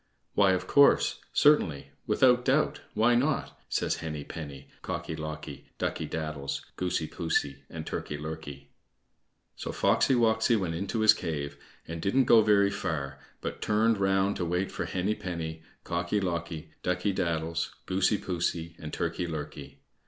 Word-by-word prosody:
"Why, 100 -2 +5
of 95 0 -1
course, 140 +8 +5
certainly, 80 - +3 0.2
without 125 -1 +4
doubt, 140 +4 +2
why 115 +3 +4
not?" 135 +5 +1
says - - 0
Henny 75 -2 -5
penny, 70 -4 -8
Cocky 80 - -4
locky, 75 0 -7
Ducky - - -2
daddles, 75 -3 -4
Goosey 90 -3 -1
poosey, 75 -5 -1
and 80 -1 -6
Turkey 75 - -4
lurkey. 75 -2 -7 0.9
So - - -5
Foxy 135 - +3
woxy 115 0 +3
went 90 -4 -2
into 100 +6 -2
his 110 0 +8
cave, 70 -3 -4 0.3
and 80 0 -5
he - - +2
didn't 130 +4 +3
go 115 -2 +7
very 100 -2 +4
far, 70 -9 -3 0.2
but - - -5
turned 110 0 +2
round 95 +1 +2
to - - -1
wait 90 +3 -1
for - - -3
Henny 95 +3 0
penny, 80 -5 -5 0.2
Cocky 85 +4 -1
locky, 85 -4 -3
Ducky 90 +3 0
daddles, 85 -2 -1
Goosey 95 +3 +2
poosey, 85 -2 -2
and 75 -1 -7
Turkey 90 - -2
lurkey. 80 -3 -7
85 Hz, 150 wpm, -29 LUFS, 80-105 Hz, 0.9 s, his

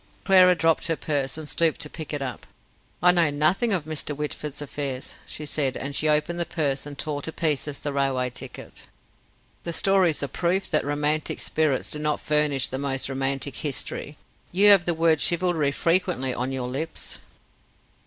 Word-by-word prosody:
Clara 185 -2 +6
dropped 165 0 +1
her 165 - +1
purse, 145 -3 -2
and 155 -1 -7
stooped 160 +1 +2
and 150 - -12
picked 155 -3 -6
it 145 -2 -3
up. 125 -4 -7 0.6
"I 180 - +8
know 170 -3 +3
nothing 155 +11 +2
of 180 -6 +1
Mr. 155 -1 -3
Whitford's 150 0 -5
affairs," 140 -3 -5
she 150 - -6
said, 140 -3 0
and 140 +1 -4
she 155 - +2
opened 155 +3 +1
the 170 - 0
purse 145 -5 -1
and 145 -1 -8
tore 145 -1 -3
to 160 - -4
pieces 150 -3 0
the 145 - -4
railway 135 -2 0
ticket. 125 - -9 0.8
"The 170 - -4
story's 185 -5 +3
a - - -1
proof 180 +7 -1
that 155 - +3
romantic 150 +1 -1
spirits 155 -4 0
do 150 - -2
not 150 0 0
furnish 150 -3 +2
the 130 - -4
most 135 -1 -1
romantic 135 -1 -2
history. 145 0 -3 0.3
You 200 +4 +5
have 195 -4 +6
the 175 - +1
word 160 -1 +3
'chivalry' 170 -4 +1
frequently 165 -4 0
on 125 +2 -3
your 130 -2 -3
lips. 155 +6 -5
150 Hz, 180 wpm, -24 LUFS, 140-165 Hz, 0.8 s, I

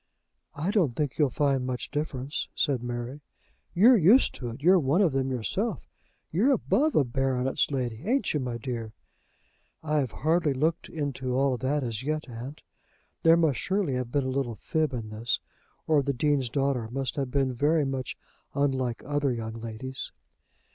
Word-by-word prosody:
"I 160 +7 -1
don't 170 - +2
think 150 -2 -2
you'll 145 -3 +4
find 135 0 +1
much 125 -1 -4
difference," 145 -2 -3
said 140 -6 +1
Mary. 120 +3 -5 0.5
"You're 225 +6 +7
used 205 +11 +6
to 120 - -5
it. 120 +4 -9
You're 185 +2 +6
one 145 +4 +2
of 190 -6 +4
them 135 0 0
yourself. 120 -7 -2 0.4
You're 225 - +3
above 300 +4 +1
a - - +5
baronet's 130 +1 0
lady, 125 -5 -2
ain't 245 +3 +1
you, 150 - +1
my 125 -3 -3
dear?" 115 -3 -5 0.9
"I 155 -1 +1
have 135 -3 0
hardly 155 - +1
looked 160 +5 0
into 135 -5 -3
all 135 0 +2
that 135 +3 0
as 115 -2 -3
yet, 155 +3 -2
aunt." 125 +4 -8 0.6
There 165 0 +6
must 155 -7 +2
surely 190 -7 0
have 125 -1 -2
been 140 +1 +1
a - - -1
little 130 -4 -1
fib 155 +5 -1
in 115 -4 -5
this, 110 +3 -1 0.5
or 155 -2 +4
the 140 0 -1
Dean's 135 -1 +1
daughter 135 -3 0
must 135 +1 -3
have 135 -3 -2
been 135 -1 +1
very 150 +4 +2
much 135 -2 -3 0.4
unlike 130 -4 0
other 145 -1 0
young 115 -2 -4
ladies. 115 +3 -6
135 Hz, 175 wpm, -27 LUFS, 125-150 Hz, 0.9 s, You're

